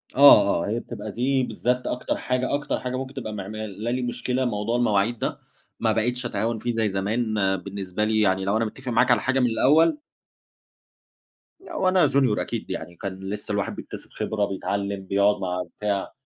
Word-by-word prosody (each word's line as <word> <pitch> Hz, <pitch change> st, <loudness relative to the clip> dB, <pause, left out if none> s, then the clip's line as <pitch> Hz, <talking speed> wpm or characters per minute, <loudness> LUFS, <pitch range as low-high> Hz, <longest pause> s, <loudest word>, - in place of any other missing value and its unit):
آه، -, -, +7 dB
آه، -, -, -4 dB
هي -, -, 0 dB
بتبقى -, -, -7 dB
دي 130 Hz, +2 st, +1 dB
بالذات 125 Hz, 0 st, -1 dB
أكتر 125 Hz, -, -2 dB
حاجة 125 Hz, +1 st, -1 dB
أكتر 145 Hz, -, -2 dB
حاجة 125 Hz, 0 st, -4 dB
ممكن 130 Hz, +1 st, -5 dB
تبقى 115 Hz, -5 st, -5 dB
معملالي 110 Hz, +4 st, -4 dB
مشكلة 125 Hz, +1 st, -1 dB
موضوع 110 Hz, 0 st, -1 dB
المواعيد 110 Hz, 0 st, +1 dB
ده، -, -, -2 dB, 0.4 s
ما -, -, +2 dB
بقيتش 125 Hz, +3 st, 0 dB
أتهاون 110 Hz, +1 st, -1 dB
فيه 120 Hz, +2 st, -1 dB
زي 115 Hz, -2 st, +1 dB
زمان، 110 Hz, +4 st, -1 dB, 0.2 s
بالنسبة 95 Hz, +1 st, -4 dB
لي 110 Hz, 0 st, +2 dB
يعني 95 Hz, -2 st, +2 dB
لو 100 Hz, +2 st, +2 dB
أنا 115 Hz, -, +1 dB
مِتَّفق 130 Hz, +3 st, -6 dB
معاك 125 Hz, +2 st, +4 dB
على 120 Hz, -, +4 dB
حاجة 130 Hz, +1 st, +1 dB
من 125 Hz, -2 st, +3 dB
الأول 160 Hz, -, +4 dB, 1.7 s
وأنا 185 Hz, -, +3 dB
Junior 130 Hz, -6 st, +2 dB
أكيد -, -, -4 dB
يعني، 85 Hz, -, -5 dB
كان 95 Hz, 0 st, -6 dB
لِسّه 100 Hz, +2 st, -5 dB
الواحد 100 Hz, -1 st, -1 dB
بيكتسب -, -, -9 dB
خبرة، 105 Hz, -2 st, -1 dB
بيتعلِّم، 100 Hz, 0 st, -3 dB
بيقعُد 100 Hz, +1 st, +2 dB
مع 90 Hz, -1 st, -2 dB
بتاع. 100 Hz, -2 st, -2 dB
110 Hz, 175 wpm, -24 LUFS, 100-125 Hz, 1.7 s, آه